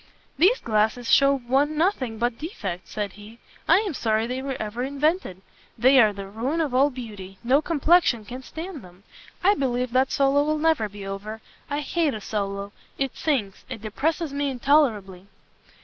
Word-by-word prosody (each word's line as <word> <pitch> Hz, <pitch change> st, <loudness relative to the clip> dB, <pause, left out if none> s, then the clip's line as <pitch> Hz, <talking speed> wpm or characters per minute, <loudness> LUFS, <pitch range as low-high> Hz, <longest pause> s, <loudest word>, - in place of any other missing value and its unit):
"These 375 Hz, -, +4 dB
glasses 220 Hz, +2 st, 0 dB
shew 275 Hz, 0 st, +6 dB
one 275 Hz, +4 st, 0 dB
nothing 280 Hz, -, 0 dB
but 235 Hz, 0 st, -1 dB
defects," 195 Hz, -, -5 dB
said 205 Hz, -2 st, -3 dB
he; 210 Hz, +2 st, -13 dB, 0.3 s
"I 340 Hz, +5 st, +6 dB
am 405 Hz, -6 st, -3 dB
sorry 220 Hz, -4 st, 0 dB
they 250 Hz, +2 st, -3 dB
were 270 Hz, -1 st, -4 dB
ever 215 Hz, +3 st, -4 dB
invented. 280 Hz, -, -1 dB, 0.3 s
They 260 Hz, +4 st, +6 dB
are 215 Hz, -3 st, +6 dB
the 200 Hz, -1 st, -7 dB
ruin 235 Hz, +11 st, -3 dB
of 300 Hz, -6 st, -1 dB
all 270 Hz, +3 st, +4 dB
beauty; 210 Hz, -7 st, -9 dB
no 265 Hz, +5 st, +3 dB
complexion 315 Hz, -7 st, +3 dB
can 250 Hz, +4 st, -7 dB
stand 320 Hz, +3 st, -8 dB
them. 180 Hz, +1 st, -16 dB, 0.4 s
I 395 Hz, +3 st, +6 dB
believe 250 Hz, -, -1 dB
that 260 Hz, +1 st, +2 dB
solo 280 Hz, +1 st, +3 dB
will 305 Hz, +1 st, 0 dB
never 305 Hz, -9 st, +1 dB
be 200 Hz, -1 st, -9 dB
over; 200 Hz, +3 st, -6 dB, 0.3 s
I 290 Hz, +1 st, -1 dB
hate 305 Hz, -2 st, 0 dB
a -, -, -5 dB
solo; 200 Hz, -1 st, -3 dB, 0.3 s
it 270 Hz, -2 st, -2 dB
sinks, 240 Hz, -11 st, -1 dB
it 235 Hz, -5 st, -7 dB
depresses 300 Hz, +8 st, -1 dB
me 285 Hz, 0 st, -1 dB
intolerably." 230 Hz, -9 st, +1 dB
255 Hz, 175 wpm, -24 LUFS, 215-290 Hz, 0.4 s, shew